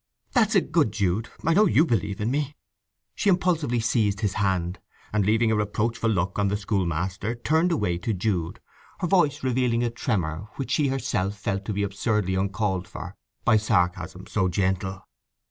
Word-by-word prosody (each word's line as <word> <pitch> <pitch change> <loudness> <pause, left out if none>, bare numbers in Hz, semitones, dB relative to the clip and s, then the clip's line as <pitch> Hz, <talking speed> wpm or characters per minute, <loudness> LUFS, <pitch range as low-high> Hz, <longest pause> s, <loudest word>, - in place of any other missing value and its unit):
"That's 220 -4 +3
a 195 - +6
good 155 -11 +1
Jude—I 110 - -1
know 210 +4 +5
you 160 -1 +4
believe 100 - -1
in 110 +3 0
me!" 145 +1 -1 0.6
She 205 - 0
impulsively 165 -9 +2
seized 110 -3 +1
his 100 -3 0
hand, 95 -3 0 0.3
and 105 -1 +2
leaving 110 +3 +3
a - - +3
reproachful 110 +2 0
look 95 -2 0
on 100 - +2
the 100 +1 0
schoolmaster 95 +1 -1
turned 160 +8 +1
away 90 - 0
to 105 +6 -2
Jude, 90 -4 -1 0.4
her - - +1
voice 165 -8 +2
revealing 125 -2 +1
a 120 - 0
tremor 100 - -2
which 135 -2 -4
she 145 0 +2
herself 105 -7 -1
felt 100 0 -3
to 105 - -2
be 100 +1 -1
absurdly 100 -1 0
uncalled 95 -1 -1
for - - -8 0.3
by 110 - +5
sarcasm 90 -4 0
so 95 - 0
gentle. 95 0 -1
105 Hz, 170 wpm, -25 LUFS, 95-125 Hz, 0.6 s, a